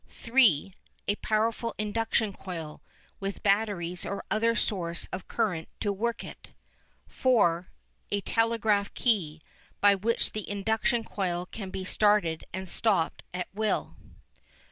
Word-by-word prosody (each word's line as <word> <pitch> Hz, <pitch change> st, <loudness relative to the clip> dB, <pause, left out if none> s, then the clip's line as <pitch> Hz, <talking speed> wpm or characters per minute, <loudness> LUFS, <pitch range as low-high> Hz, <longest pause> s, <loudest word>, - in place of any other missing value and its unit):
(3) 225 Hz, -, +3 dB, 0.3 s
A 205 Hz, -, +2 dB
powerful 225 Hz, +1 st, 0 dB
Induction 215 Hz, 0 st, 0 dB
Coil 165 Hz, -6 st, -7 dB, 0.4 s
with 195 Hz, 0 st, -4 dB
batteries 195 Hz, -4 st, +1 dB
or 200 Hz, -, -4 dB
other 230 Hz, +1 st, +2 dB
source 170 Hz, -6 st, -1 dB
of 185 Hz, -, -5 dB
current 195 Hz, -8 st, -1 dB
to 205 Hz, -2 st, 0 dB
work 230 Hz, +4 st, -2 dB
it. -, -, -11 dB, 0.5 s
(4) 185 Hz, -9 st, +2 dB, 0.4 s
A 205 Hz, 0 st, 0 dB
Telegraph 220 Hz, -2 st, +1 dB
Key, 165 Hz, -10 st, 0 dB, 0.4 s
by 205 Hz, 0 st, +6 dB
which 215 Hz, +4 st, +1 dB
the 215 Hz, -, -5 dB
induction 220 Hz, +3 st, +1 dB
coil 180 Hz, -5 st, -2 dB
can 195 Hz, +1 st, -7 dB
be 185 Hz, 0 st, -5 dB
started 205 Hz, -6 st, +2 dB
and 190 Hz, +1 st, -5 dB
stopped 180 Hz, -4 st, +1 dB
at 180 Hz, 0 st, -3 dB
will. 215 Hz, +1 st, -1 dB
205 Hz, 125 wpm, -28 LUFS, 180-220 Hz, 0.5 s, by